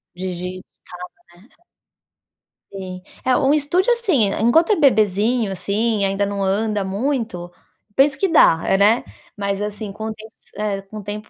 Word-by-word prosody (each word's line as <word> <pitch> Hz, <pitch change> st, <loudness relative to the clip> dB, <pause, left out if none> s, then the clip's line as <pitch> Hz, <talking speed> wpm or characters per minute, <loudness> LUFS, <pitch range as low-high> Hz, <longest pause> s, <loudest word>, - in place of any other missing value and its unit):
Digital, 180 Hz, 0 st, -6 dB, 0.7 s
né. 180 Hz, +6 st, -20 dB, 1.3 s
Sim, 185 Hz, -2 st, -7 dB, 0.2 s
é, 255 Hz, -, +3 dB
um 275 Hz, +2 st, +3 dB
estúdio, 330 Hz, -, +1 dB
assim, 380 Hz, -, +2 dB
e -, -, -2 dB
enquanto 320 Hz, -, +4 dB
é 415 Hz, -, +3 dB
bebezinho 220 Hz, -, +2 dB
assim, 205 Hz, +2 st, 0 dB
ainda 195 Hz, +1 st, 0 dB
não 200 Hz, 0 st, -3 dB
anda 205 Hz, +1 st, 0 dB
muito, 205 Hz, -4 st, -3 dB, 0.5 s
penso 270 Hz, 0 st, +4 dB
que 385 Hz, +7 st, 0 dB
dá, 325 Hz, -, +6 dB, 0.2 s
hã, -, -, +4 dB
né, 210 Hz, +4 st, +4 dB, 0.3 s
mas 200 Hz, -1 st, -2 dB
assim, 210 Hz, 0 st, -5 dB
com 215 Hz, +2 st, -7 dB
o 220 Hz, -, -3 dB
tempo 220 Hz, 0 st, -14 dB, 0.2 s
é, 205 Hz, -2 st, -2 dB
com 195 Hz, +2 st, -11 dB
o -, -, -9 dB
tempo, 210 Hz, +1 st, -7 dB
210 Hz, 160 wpm, -20 LUFS, 195-250 Hz, 1.3 s, dá